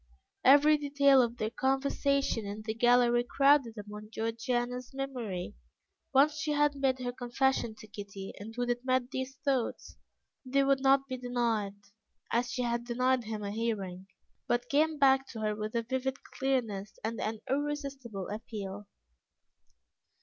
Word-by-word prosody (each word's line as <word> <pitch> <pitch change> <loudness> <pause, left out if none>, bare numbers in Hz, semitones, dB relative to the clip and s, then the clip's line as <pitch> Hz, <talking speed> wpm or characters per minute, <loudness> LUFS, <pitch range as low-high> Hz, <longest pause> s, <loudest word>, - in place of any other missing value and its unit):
Every 290 +3 +7
detail 280 -2 +5
of 235 0 -1
their 215 -1 -2
conversation 270 -1 +1
in 205 +1 -6
the 220 0 -2
gallery 240 +1 +4
crowded 275 -2 +3
upon 210 +1 -8
Georgiana's 240 +3 -2
memory, 240 -10 -4 0.6
once 295 +3 +4
she 310 -1 0
had 295 0 +3
made 270 -2 +1
her 250 -1 -3
confession 245 -1 0
to 215 - -12
Kitty, 200 -2 -8
and 210 +3 -8
would 245 0 0
admit 255 +1 0
these 260 0 -4
thoughts; 265 -4 -1 0.5
they 275 +1 +2
would 275 -1 +2
not 270 0 +4
be 260 -1 -4
denied, 235 -5 -1 0.6
as 240 +1 +1
she 250 - -1
had 235 0 -1
denied 250 0 +1
him 215 -1 -4
a 200 - -3
hearing, 200 -4 -3 0.4
but 240 0 0
came 310 +2 +2
back 270 -1 +4
to 225 - -7
her 215 -1 0
with 215 +2 -5
a 230 - +1
vivid 260 +2 -3
clearness 225 -7 -2
and 225 +1 -3
an 215 0 -3
irresistible 275 -8 -3
appeal. 205 -1 -6
245 Hz, 150 wpm, -31 LUFS, 220-270 Hz, 0.6 s, Every